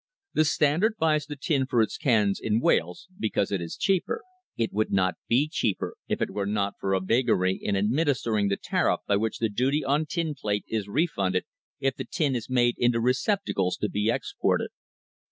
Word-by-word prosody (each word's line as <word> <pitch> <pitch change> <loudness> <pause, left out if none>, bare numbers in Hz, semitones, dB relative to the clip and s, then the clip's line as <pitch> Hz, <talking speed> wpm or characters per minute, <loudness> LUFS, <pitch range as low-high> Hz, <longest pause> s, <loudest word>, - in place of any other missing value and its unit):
The 155 - +3
Standard 160 +9 +2
buys 155 -2 +1
the 145 - -5
tin 140 -2 0
for 120 - +1
its 110 - +1
cans 105 -6 +2
in 110 0 +1
Wales, 90 - +1
because 105 -2 0
it 100 -3 -1
is 85 - -6
cheaper. 195 - 0 0.3
It 115 -1 -1
would 110 +2 0
not 95 -2 +2
be 130 +6 +3
cheaper 115 - -1
if - - 0
it - - -3
were 100 -1 -2
not 100 -1 0
for 95 0 0
a - - +2
vagary 95 -3 +2
in 100 - -1
administering 115 -1 +1
the 100 - 0
tariff - - 0
by 100 - +2
which 110 +1 -1
the 115 - +1
duty 135 +7 0
on 145 +3 +1
tin 165 -1 -2
plate 105 -7 -2
is 110 -3 -2
refunded 100 - 0 0.3
if 135 0 0
the 135 - -5
tin 140 0 0
is 120 0 -4
made 120 -2 +2
into 120 -1 +3
receptacles 125 - 0
to 105 - -1
be 105 +2 0
ex - - -2
ported. - - +2
115 Hz, 195 wpm, -26 LUFS, 100-145 Hz, 0.3 s, The